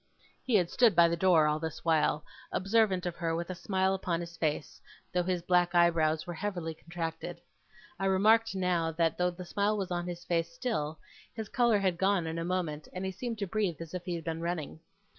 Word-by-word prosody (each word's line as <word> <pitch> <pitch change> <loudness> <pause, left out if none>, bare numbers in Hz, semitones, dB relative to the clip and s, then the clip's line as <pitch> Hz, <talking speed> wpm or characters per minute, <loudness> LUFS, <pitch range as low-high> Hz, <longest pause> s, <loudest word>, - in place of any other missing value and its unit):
He 250 -4 +1
had 180 -4 +3
stood 235 -6 +4
by 170 0 +7
the 170 - 0
door, 170 -3 +4
all 150 0 +1
this 160 0 -6
while, 155 -2 +2 0.3
observant 195 -2 +2
of 175 -1 -2
her 165 -1 -1
with 170 +2 -3
a - - -2
smile 190 +1 0
upon 180 -3 -1
his 170 -1 -7
face, 155 -2 -2 0.3
though 180 - +2
his 180 -1 -1
black 175 -1 +2
eyebrows 160 -2 +3
were 175 - -5
heavily 175 -3 -3
contracted. 165 +1 -5 0.6
I 195 - -1
remarked 215 +3 +4
now, 180 -3 +1
that, 165 0 +1
though 180 0 +3
the 180 +1 -8
smile 205 +4 0
was 190 -3 -3
on 175 0 -2
his 175 0 -6
face 165 -1 0
still, 165 -7 -2 0.4
his 220 -2 -5
colour 235 -3 +3
had 185 -3 0
gone 195 -3 +2
in 160 +1 -3
a - - -2
moment, 170 -4 -2
and 185 +1 -4
he 190 - -2
seemed 230 +5 -5
to 205 - -2
breathe 195 -4 -1
as 165 0 -8
if 180 -1 -4
he 180 -2 -2
had 165 - -5
been 165 0 -3
running. 165 -3 -3
175 Hz, 215 wpm, -30 LUFS, 165-190 Hz, 0.6 s, by